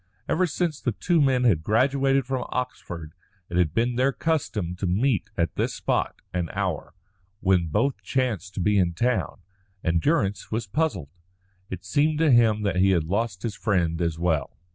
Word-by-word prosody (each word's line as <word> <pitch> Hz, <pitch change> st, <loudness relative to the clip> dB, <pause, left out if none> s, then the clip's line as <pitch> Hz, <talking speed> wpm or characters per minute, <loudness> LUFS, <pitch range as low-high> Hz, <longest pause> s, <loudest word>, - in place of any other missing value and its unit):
Ever 185 Hz, +2 st, +2 dB
since 165 Hz, -1 st, -2 dB
the 120 Hz, -, -1 dB
two 170 Hz, -, +1 dB
men 130 Hz, -3 st, +3 dB
had 100 Hz, -11 st, +3 dB
graduated 135 Hz, -, +2 dB
from 130 Hz, -1 st, -2 dB
Oxford 85 Hz, -10 st, -5 dB, 0.4 s
it 85 Hz, -, -1 dB
had 85 Hz, -4 st, +3 dB
been 120 Hz, +7 st, 0 dB
their 130 Hz, +2 st, +3 dB
custom 120 Hz, -, -1 dB
to 95 Hz, -, -2 dB
meet 105 Hz, +4 st, +1 dB
at 85 Hz, -1 st, 0 dB
this -, -, -1 dB
spot -, -, -1 dB
and 90 Hz, -2 st, -1 dB
hour, 95 Hz, -5 st, -3 dB, 0.4 s
when 90 Hz, -4 st, +2 dB
both 135 Hz, -, 0 dB
chanced 110 Hz, -8 st, -2 dB
to -, -, -2 dB
be 105 Hz, +2 st, +3 dB
in 85 Hz, -2 st, +1 dB
town, 120 Hz, -1 st, -1 dB, 0.4 s
and 85 Hz, -1 st, +1 dB
Durrance 105 Hz, -11 st, 0 dB
was 110 Hz, 0 st, -2 dB
puzzled. 95 Hz, -, -1 dB, 0.6 s
It 95 Hz, 0 st, -7 dB
seemed 150 Hz, +10 st, +2 dB
to 160 Hz, -2 st, +3 dB
him 110 Hz, -3 st, +4 dB
that 100 Hz, -3 st, 0 dB
he 95 Hz, +1 st, +4 dB
had 90 Hz, -4 st, +3 dB
lost 100 Hz, +2 st, -2 dB
his 115 Hz, -, -2 dB
friend 90 Hz, -6 st, 0 dB
as 85 Hz, -2 st, 0 dB
well. 80 Hz, -5 st, -1 dB
105 Hz, 180 wpm, -25 LUFS, 90-130 Hz, 0.6 s, him